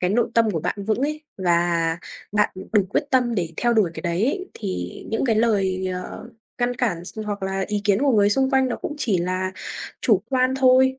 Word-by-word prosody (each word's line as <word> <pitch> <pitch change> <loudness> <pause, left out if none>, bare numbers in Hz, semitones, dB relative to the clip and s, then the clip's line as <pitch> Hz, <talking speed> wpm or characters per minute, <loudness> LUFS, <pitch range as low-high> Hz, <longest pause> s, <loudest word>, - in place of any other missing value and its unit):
cái 180 +1 +1
nội 235 +3 +1
tâm 230 -2 +4
của 165 -6 -2
bạn 200 +4 -3
vững 215 +2 0
ấy 305 +2 -1 0.2
và 170 -2 +1 0.3
bạn 210 0 +3 0.2
đủ 210 -2 +5
quyết - - +1
tâm 245 -3 +2
để 170 -4 -2
theo 240 -1 +2
đuổi 210 -7 +3
cái - - -6
đấy 175 +4 0
ấy 370 +7 -2
thì 90 -1 -5
những 225 - 0
cái 225 -4 +2
lời, 195 -5 +1
ờ, 185 +5 -5 0.3
ngăn 245 0 +1
cản 180 -9 -1
s 220 - -8
hoặc 205 -2 -4
là 190 0 -1
ý 210 -1 -1
kiến 200 0 +3
của 275 -3 +3
người 205 -1 +4
xung 265 +4 +2
quanh 265 -1 +3
nó 240 - -2
cũng 295 - -5
chỉ 205 -10 +1
là 185 +2 -1 0.5
chủ 205 -6 +3
quan 255 0 +2
thôi, 260 0 +4
210 Hz, 225 wpm, -23 LUFS, 185-250 Hz, 0.5 s, đủ